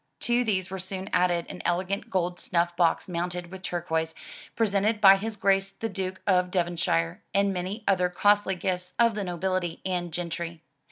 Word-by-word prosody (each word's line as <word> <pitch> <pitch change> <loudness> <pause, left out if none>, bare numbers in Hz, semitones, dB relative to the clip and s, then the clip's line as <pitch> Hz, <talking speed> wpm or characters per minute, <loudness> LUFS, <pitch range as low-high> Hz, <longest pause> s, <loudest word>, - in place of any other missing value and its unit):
To 240 +1 +2
these 190 -5 -1
were 190 - -4
soon 190 +1 -6
added 180 -1 +2
an - - -7
elegant 190 +5 -1
gold 180 -3 -1
snuiBf 175 -1 0
box 170 -1 +2
mounted 175 0 -3
with 190 -1 -8
turquoise, 160 -2 -2 0.4
presented 210 0 +1
by 195 -2 +8
his 220 +2 -4
Grace 195 -1 +2
the 210 +3 -5
Duke 190 -2 -4
of 180 -2 +3
Devonshire, 170 - 0
and 200 0 +3
many 190 +4 -4
other 180 -2 +3
costly 205 +1 +3
gifts 180 0 -3
of 235 -1 +4
the 205 0 -3
nobility 180 -1 -2
and 175 -2 -2
gentry. 170 -1 -4
185 Hz, 170 wpm, -27 LUFS, 175-195 Hz, 0.4 s, by